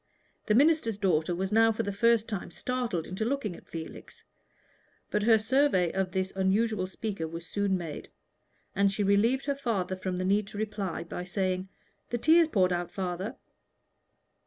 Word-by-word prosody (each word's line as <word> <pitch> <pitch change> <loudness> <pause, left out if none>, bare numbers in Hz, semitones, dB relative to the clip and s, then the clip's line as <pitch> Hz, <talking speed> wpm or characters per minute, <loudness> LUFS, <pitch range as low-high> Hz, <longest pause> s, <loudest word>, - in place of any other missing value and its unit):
The 210 - +3
minister's 280 -5 +3
daughter 175 -4 +1
was 190 +2 -2
now 225 +1 +5
for 225 +1 -2
the 200 - -2
first 230 +2 +3
time 205 -5 -4
startled 245 -10 -2
into 185 +4 -4
looking 230 -6 -2
at - - -15
Felix. 165 -1 -9 0.9
But 210 - +1
her 220 +1 +5
survey 220 - +2
of 190 -1 -1
this 190 +1 -2
unusual 195 +1 +1
speaker 195 -4 -4
was 165 +1 -7
soon 200 +1 0
made, 165 -4 -7 0.7
and 200 0 +3
she 205 +1 -1
relieved 220 +7 +2
her 280 - +1
father 215 -9 -2
from 185 -1 -3
the 185 - -2
need 200 +2 +2
to 205 - -9
reply 205 -5 -3
by 170 +1 -6
saying 185 0 -2 0.4
"The 240 - -1
tea 320 +8 +5
is 335 - +5
poured 185 - +2
out, 175 0 -2
father." 185 +1 -4
200 Hz, 175 wpm, -29 LUFS, 185-225 Hz, 0.9 s, now